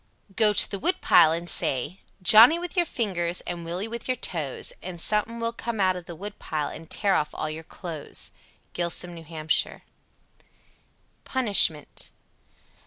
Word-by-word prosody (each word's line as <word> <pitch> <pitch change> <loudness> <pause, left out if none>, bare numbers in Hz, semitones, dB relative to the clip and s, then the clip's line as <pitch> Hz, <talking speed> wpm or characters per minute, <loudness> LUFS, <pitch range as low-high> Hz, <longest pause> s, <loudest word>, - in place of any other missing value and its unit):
88. - - -35
Go 215 -2 +4
to - - +4
the 200 - -3
woodpile 350 - +4
and 170 +1 -3
say, 150 +2 +1 0.2
"Johnnie 220 - +8
with 350 0 -6
your 350 -2 +1
fingers, 180 - -2
and 175 -1 -6
Willie 175 +5 -4
with 235 0 -6
your 255 -1 -1
toes," 155 - -3
and 180 -1 -8
something 210 +5 0
(suthin) - - -8
will 230 0 -2
come 235 -1 -5
out 185 -1 +2
of 180 -1 -7
the 170 - -8
woodpile 160 -6 -5
and 165 - -11
tear 200 -2 +1
off 150 -4 0
all 155 - -3
your 155 +1 -7
clothes 165 -2 -7 0.4
(close). 170 0 -1
Gilsum, 175 - -10
N.H. 160 -1 0 1.6
PUNISHMENT. 200 - +2
180 Hz, 165 wpm, -25 LUFS, 165-220 Hz, 1.6 s, Johnnie